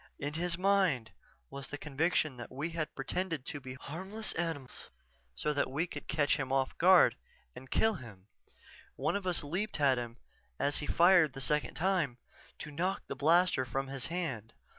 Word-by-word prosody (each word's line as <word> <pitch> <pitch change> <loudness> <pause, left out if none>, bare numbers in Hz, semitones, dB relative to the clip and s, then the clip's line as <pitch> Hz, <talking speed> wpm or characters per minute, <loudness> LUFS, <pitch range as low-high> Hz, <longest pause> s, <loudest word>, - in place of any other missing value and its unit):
In 145 +1 -4
his 170 +1 0
mind 180 - +2 0.4
was 140 0 -5
the 145 - -6
conviction 150 0 0
that 120 - -8
we 145 +6 -3
had 160 -2 -3
pretended 160 +1 -3
to 145 - -4
be 130 -1 -8
harmless 190 +10 -5
animals 160 -6 -4 0.5
so 150 - 0
that 145 - 0
we 145 +6 0
could 150 -4 -8
catch 145 0 +2
him 135 -3 -3
off 135 -1 +1
guard 185 +1 +7 0.4
and 130 - -11
kill 220 0 +3
him. 110 - -10 0.7
One - - 0
of 200 -2 -2
us 180 -4 +1
leaped 180 +6 -2
at 135 -3 +4
him 120 0 -6 0.4
as 145 - +1
he 145 - -4
fired 175 -4 +5
the 135 - -7
second 145 0 0
time, 170 -8 +1 0.4
to 150 - -7
knock 180 +6 -1
the - - -5
blaster 170 -1 +4
from 135 +2 -3
his 135 -2 -3
hand. 140 - -4
150 Hz, 180 wpm, -32 LUFS, 135-175 Hz, 0.7 s, guard